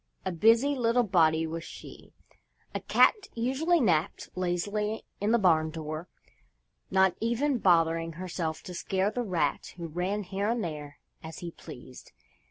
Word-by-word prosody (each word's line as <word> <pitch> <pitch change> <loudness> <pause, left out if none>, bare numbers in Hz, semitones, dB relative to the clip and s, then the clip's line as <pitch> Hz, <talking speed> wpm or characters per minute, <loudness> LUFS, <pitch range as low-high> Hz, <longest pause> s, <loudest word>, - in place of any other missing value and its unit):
A 190 - 0
busy 225 - +4
little 245 -2 +2
body 165 -5 +3
was 165 +1 -5
she! - - -11 0.6
A - - -2
cat 420 -3 +3
usually 270 +9 +1
napped 175 - +1
lazily 205 +4 -2
in 205 +2 +1
the 235 - +5
barn 160 -6 +3
door, 155 +1 -6 0.8
not 190 -1 +3
even 240 +4 +1
bothering 165 -3 +3
herself 170 -2 -4
to 180 - -8
scare 190 +3 0
the 245 - -2
rat 185 -8 -1
who 170 - -5
ran 180 +6 -2
here 200 +2 -2
and 235 -1 0
there 150 -3 -6 0.2
as 160 0 -9
he 175 -2 -6
pleased. 130 - -12
185 Hz, 150 wpm, -29 LUFS, 165-225 Hz, 0.8 s, the